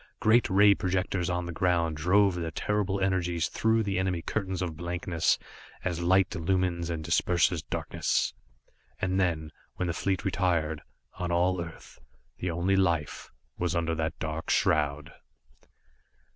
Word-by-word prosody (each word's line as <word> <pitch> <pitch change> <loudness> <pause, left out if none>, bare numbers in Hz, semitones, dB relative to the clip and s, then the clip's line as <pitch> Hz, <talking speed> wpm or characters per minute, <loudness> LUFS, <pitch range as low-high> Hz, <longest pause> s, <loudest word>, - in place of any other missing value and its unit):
Great 115 +2 +4
ray 100 +2 +6
projectors 90 -1 -1
on 90 0 -1
the 85 - -5
ground 85 -2 +1
drove 95 +5 +3
their 85 -2 -3
terrible 100 +3 -1
energies 90 -3 0
through 110 0 +2
the 95 -2 -1
enemy 95 -2 0
curtains 95 -4 -2
of 85 -3 -4
blankness, 85 0 0 0.5
as 85 -2 -1
light 95 +1 +3
illumines 85 0 0
and 80 -2 -3
disperses 85 +1 +2
darkness. - - -1 0.7
And 95 0 0
then, 80 -4 0 0.2
when 90 - -2
the 85 - -1
fleet 95 +1 -1
retired, 85 -6 0 0.4
on 90 -1 -2
all 90 +1 +2
Earth, 80 -1 -12 0.4
the 90 - -2
only 85 +3 +1
life 85 -6 0 0.3
was 90 +1 0
under 85 -1 0
that 80 -2 -2
dark 80 +4 -4
shroud! 75 -3 +1
90 Hz, 145 wpm, -28 LUFS, 85-95 Hz, 0.7 s, ray